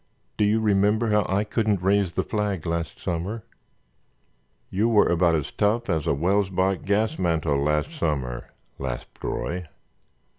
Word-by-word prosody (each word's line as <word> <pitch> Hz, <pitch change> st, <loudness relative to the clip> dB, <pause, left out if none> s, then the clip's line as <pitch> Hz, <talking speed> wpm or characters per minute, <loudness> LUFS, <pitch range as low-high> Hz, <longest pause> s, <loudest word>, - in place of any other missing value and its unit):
Do 105 Hz, -, +2 dB
you 105 Hz, +2 st, +3 dB
remember 105 Hz, +1 st, +2 dB
how 105 Hz, -2 st, +3 dB
I 100 Hz, +2 st, +2 dB
couldn't 105 Hz, -3 st, 0 dB
raise 100 Hz, -2 st, +2 dB
the -, -, 0 dB
flag 105 Hz, -6 st, -2 dB
last 85 Hz, -3 st, -3 dB
summer?" 95 Hz, +6 st, -3 dB, 1.3 s
"You 105 Hz, +5 st, +2 dB
were 110 Hz, -3 st, +5 dB
about 85 Hz, -1 st, +3 dB
as 75 Hz, -3 st, -2 dB
tough 105 Hz, +1 st, +1 dB
as 80 Hz, -3 st, -1 dB
a -, -, +3 dB
Welsbach 95 Hz, +2 st, +1 dB
gas 105 Hz, +2 st, +1 dB
mantel 80 Hz, -5 st, +1 dB
last 75 Hz, -, 0 dB
summer," 70 Hz, -, -2 dB, 0.3 s
laughed 65 Hz, -3 st, -5 dB
Roy. 90 Hz, 0 st, -3 dB
95 Hz, 145 wpm, -25 LUFS, 85-105 Hz, 1.3 s, were